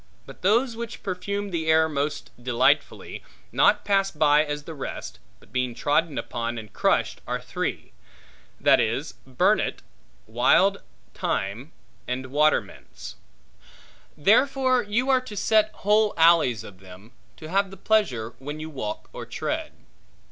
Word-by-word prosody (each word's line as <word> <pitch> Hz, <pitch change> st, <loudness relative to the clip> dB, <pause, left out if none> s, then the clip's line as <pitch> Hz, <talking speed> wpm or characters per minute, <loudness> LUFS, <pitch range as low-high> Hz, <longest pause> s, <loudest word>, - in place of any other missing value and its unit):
But -, -, -13 dB
those 230 Hz, +6 st, +2 dB
which 230 Hz, -1 st, -7 dB
perfume 200 Hz, +2 st, -3 dB
the 160 Hz, -2 st, -2 dB
air 160 Hz, 0 st, +4 dB
most 145 Hz, -1 st, -3 dB
delightfully, 125 Hz, 0 st, +1 dB, 0.3 s
not -, -, +3 dB
passed 195 Hz, -4 st, +1 dB
by 150 Hz, 0 st, +5 dB
as 145 Hz, -1 st, -4 dB
the 165 Hz, -, -8 dB
rest, 140 Hz, -, -7 dB, 0.2 s
but -, -, -23 dB
being 125 Hz, -2 st, -1 dB
trodden 145 Hz, +3 st, 0 dB
upon 115 Hz, 0 st, -3 dB
and 110 Hz, -2 st, -9 dB
crushed, -, -, +1 dB
are -, -, -2 dB
three; -, -, -4 dB, 0.7 s
that -, -, +5 dB
is, 125 Hz, +7 st, -1 dB
burnet, 130 Hz, -1 st, +1 dB, 0.4 s
wildthyme, 115 Hz, -, 0 dB, 0.4 s
and 130 Hz, +1 st, -4 dB
watermints. 150 Hz, +2 st, -1 dB, 1.0 s
Therefore 255 Hz, -, +3 dB
you 240 Hz, +5 st, 0 dB
are 260 Hz, -1 st, +4 dB
to 215 Hz, -5 st, -9 dB
set 215 Hz, +1 st, +3 dB
whole 210 Hz, +1 st, +2 dB
alleys 160 Hz, -9 st, +4 dB
of 95 Hz, -4 st, -12 dB
them, 95 Hz, +4 st, -14 dB, 0.3 s
to 155 Hz, -, -9 dB
have 195 Hz, +2 st, +1 dB
the 195 Hz, -, -11 dB
pleasure 130 Hz, -, 0 dB
when 145 Hz, +3 st, -6 dB
you 155 Hz, +1 st, -7 dB
walk 110 Hz, -7 st, -5 dB
or -, -, -7 dB
tread. -, -, -3 dB
155 Hz, 135 wpm, -25 LUFS, 125-200 Hz, 1.0 s, by